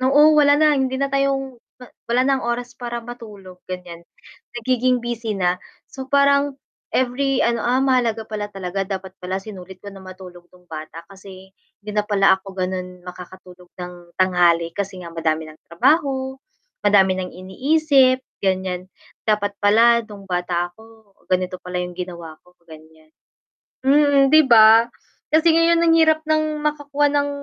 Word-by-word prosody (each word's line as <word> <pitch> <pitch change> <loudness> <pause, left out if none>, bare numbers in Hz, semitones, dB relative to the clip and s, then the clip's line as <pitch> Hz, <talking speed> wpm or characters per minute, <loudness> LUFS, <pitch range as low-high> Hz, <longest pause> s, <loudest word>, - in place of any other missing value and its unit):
oo, 270 +3 +4
wala 290 -1 +5
na, 305 0 +4
hindi 265 -2 0
na 275 0 -2
tayong 270 -2 -1 0.2
ma - - -10 0.2
wala 245 +2 +2
ng 270 0 +1
oras 240 +1 -3
para 240 -1 -5
matulog, 205 -6 -11
ganiyan. 180 -2 -8 0.6
Nagiging 250 +1 0
busy 230 -3 -4
na, 180 -1 0 0.2
so 265 -1 -10
parang 280 0 +2 0.4
every 260 +1 0
ano, 235 -1 0
"Ah, 255 +2 +1
mahalaga 240 -4 +1
pala 210 -1 -5
talaga, 195 -1 -5
dapat 190 -1 -5
pala 180 +1 -4
sinulit 190 -2 -10
ko 200 - -8
nang 195 -1 -13
matulog 180 -2 -13
no'ng 180 0 -23
bata, 160 +1 -9
kasi 190 -1 -14 0.3
hindi 210 - -6
na 210 0 0
pala 200 -2 +3
ako 195 - -38
ganon 185 -1 -5
makakatulog 180 0 -12
ng 175 -1 -10
tanghali 175 -2 +2
kasi 195 -1 -5
nga 170 - -9
madami 160 -1 -1
ng 155 - -23
trabaho, 265 - 0 0.4
madami 190 -2 +3
ng 180 -1 -5
iniisip." 260 - +2 0.2
ganiyan. 185 -1 -2 0.4
Dapat 205 -1 0
pala 230 +3 +5
no'ng 210 -3 -12
bata 175 -1 -2
ako, 220 0 -20 0.2
ganito 185 0 -1
pala 180 0 -7
'yong 180 - -8
ginawa 170 -3 -8
ko, 180 0 -26
ganiyan. 160 -1 -17 0.7
Mm, 280 -1 +4
'di 310 - +8
ba? 225 0 +7 0.5
Kasi 320 +1 +4
ngayon 330 +1 +4
ang 330 -1 +4
hirap 315 -1 +3
ng 310 0 0
makakuha 290 -1 0
ng 285 0 +1
210 Hz, 155 wpm, -20 LUFS, 180-265 Hz, 0.7 s, di